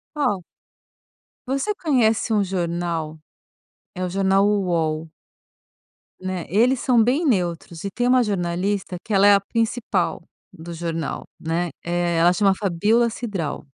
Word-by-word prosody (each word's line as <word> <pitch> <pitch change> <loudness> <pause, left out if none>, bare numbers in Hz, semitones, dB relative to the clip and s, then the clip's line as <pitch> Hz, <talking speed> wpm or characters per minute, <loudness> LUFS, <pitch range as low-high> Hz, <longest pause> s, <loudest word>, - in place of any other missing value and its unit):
Qual? 210 -11 0 1.1
Você 275 +11 -1
conhece 240 - +1
um 205 - +3
jornal 170 -4 -3 0.7
É 185 - -4
o 180 - -1
jornal 195 +1 +2
Uol. 165 -6 0 1.1
Né, 185 -2 -4
eles 240 +7 +3
são 245 -4 +3
bem 270 +9 +1
neutros. 175 - -1
E 200 - -2
tem 245 +5 -1
uma 250 0 +4
jornalista 190 0 -2
que 220 - -4
ela 200 +1 +5
é 205 - +8
a 200 - +4
principal 230 +3 -1 0.3
do 170 +1 -9
jornal, 165 -2 -4
né. 170 +2 -1
Eh, 175 0 0
ela 170 +2 +5
chama 195 +1 +3
Fabíola 210 +5 +2
Cidral. 200 -13 -4
195 Hz, 135 wpm, -22 LUFS, 170-225 Hz, 1.1 s, é